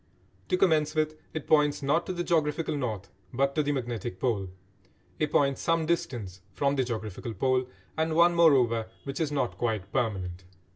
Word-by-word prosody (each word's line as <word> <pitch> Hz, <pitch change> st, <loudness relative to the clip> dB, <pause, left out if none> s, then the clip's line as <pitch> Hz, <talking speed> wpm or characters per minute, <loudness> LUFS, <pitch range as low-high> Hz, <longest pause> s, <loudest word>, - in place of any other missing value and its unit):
To 185 Hz, -, +2 dB
commence 160 Hz, -6 st, +2 dB
with, 155 Hz, 0 st, +1 dB, 0.2 s
it 160 Hz, -, -5 dB
points, 150 Hz, -2 st, +3 dB
not 150 Hz, +5 st, +1 dB
to 185 Hz, -, -2 dB
the 175 Hz, -1 st, -2 dB
geographical 155 Hz, -1 st, 0 dB
north, 110 Hz, -9 st, -4 dB, 0.2 s
but 135 Hz, +2 st, +1 dB
to 155 Hz, -, +2 dB
the 145 Hz, 0 st, 0 dB
"magnetic 120 Hz, -8 st, -3 dB
pole," 100 Hz, -6 st, 0 dB, 0.7 s
a 155 Hz, -, +2 dB
point 140 Hz, -2 st, +2 dB
some 165 Hz, -1 st, +1 dB
distance 115 Hz, -, -2 dB
from 140 Hz, +4 st, +1 dB
the 135 Hz, -, +2 dB
geographical 110 Hz, -2 st, -5 dB
pole, 130 Hz, -1 st, +1 dB, 0.3 s
and 160 Hz, 0 st, 0 dB
one, 170 Hz, +1 st, +6 dB
moreover, 130 Hz, -9 st, +4 dB, 0.2 s
which 135 Hz, 0 st, -5 dB
is 155 Hz, -3 st, 0 dB
not 135 Hz, -4 st, -1 dB
quite 110 Hz, -5 st, -2 dB
permanent. 95 Hz, -7 st, -2 dB
140 Hz, 175 wpm, -28 LUFS, 115-155 Hz, 0.7 s, one